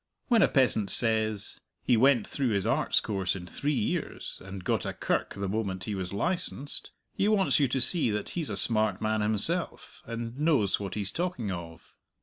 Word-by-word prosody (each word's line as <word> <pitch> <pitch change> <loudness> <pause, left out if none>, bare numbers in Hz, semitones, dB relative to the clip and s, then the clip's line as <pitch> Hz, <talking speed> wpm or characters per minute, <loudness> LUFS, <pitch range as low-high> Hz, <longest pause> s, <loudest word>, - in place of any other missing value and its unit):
When 235 -3 +5
a - - +6
peasant 120 -7 +3
says, 110 -3 +3 0.2
"He - - +3
went 125 0 +4
through 140 -3 -2
his 100 -1 0
Arts - - +2
course 95 -4 -2
in 90 -2 -7
three 145 - -2
years, 110 -4 -3
and 95 -1 -8
got - - 0
a - - -4
kirk - - -2
the 100 0 -3
moment 95 -2 -3
he 105 - -4
was 95 -2 -4
licensed," 145 - -2 0.2
he 200 - 0
wants 205 -6 +3
you 140 - +3
to 130 +2 -1
see 160 0 +4
that 105 0 -3
he's 165 -4 -3
a - - -3
smart 110 -4 +1
man 110 0 0
himself, 110 - -2
and 115 +2 -6
knows 145 - +2
what 100 -1 -5
he's 100 -2 -1
talking 170 - -3
of. 85 -2 -9
110 Hz, 190 wpm, -28 LUFS, 100-140 Hz, 0.2 s, a